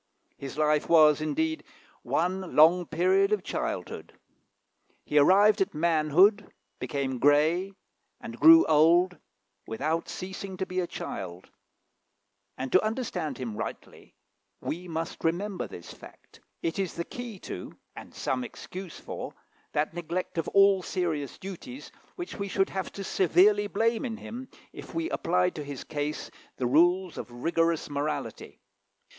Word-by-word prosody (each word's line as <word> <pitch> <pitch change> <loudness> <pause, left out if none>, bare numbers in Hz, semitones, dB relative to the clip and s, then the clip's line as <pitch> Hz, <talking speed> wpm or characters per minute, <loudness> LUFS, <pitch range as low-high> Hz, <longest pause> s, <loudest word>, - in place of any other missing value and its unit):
His 135 0 -8
life 150 -1 +2
was, 155 -2 +6
indeed, 315 - -1 0.4
one 185 +2 -1
long 165 +3 +6
period 190 +4 +2
of 210 -3 +1
childhood. - - -5 0.9
He 150 - +3
arrived 200 +7 +5
at 195 -2 0
manhood, 170 +6 +3 0.3
became 130 0 -3
grey, 155 +8 +3 0.5
and - - -9
grew 330 +1 +9
old, 170 +4 +4 0.5
without 155 +9 -2
ceasing 190 0 -6
to 190 - -2
be 185 0 -3
a 175 - -1
child; 90 - -7 1.1
and 130 0 -4
to 185 - +5
understand 215 - -3
him 120 -5 -5
rightly - - -8 0.4
we 180 +3 -5
must 165 0 -5
remember 180 +4 -1
this 85 - -10
fact. - - -16 0.2
It 165 +3 -2
is 190 -3 -2
the 170 - -3
key 245 -4 -7
to, 90 - -8 0.2
and - - -10
some 130 -1 -2
excuse 185 +7 -8
for, - - -7 0.4
that 150 +2 0
neglect 175 +1 -3
of - - -2
all 195 -1 +5
serious 165 -7 -3
duties 220 - -9 0.2
which 350 -1 -7
we 200 -2 -3
should 195 0 0
have 190 - -4
to 200 - -6
severely 200 +3 +3
blame 225 +3 0
in 230 -4 -4
him, 250 +3 -8 0.2
if - - -10
we 330 0 -2
applied 180 +1 +1
to 150 - -6
his 140 -2 -7
case 150 0 -4 0.3
the 125 - -1
rules 175 +7 +3
of - - -7
rigorous 165 +6 0
morality. 145 +1 -4
175 Hz, 140 wpm, -28 LUFS, 150-195 Hz, 1.1 s, grew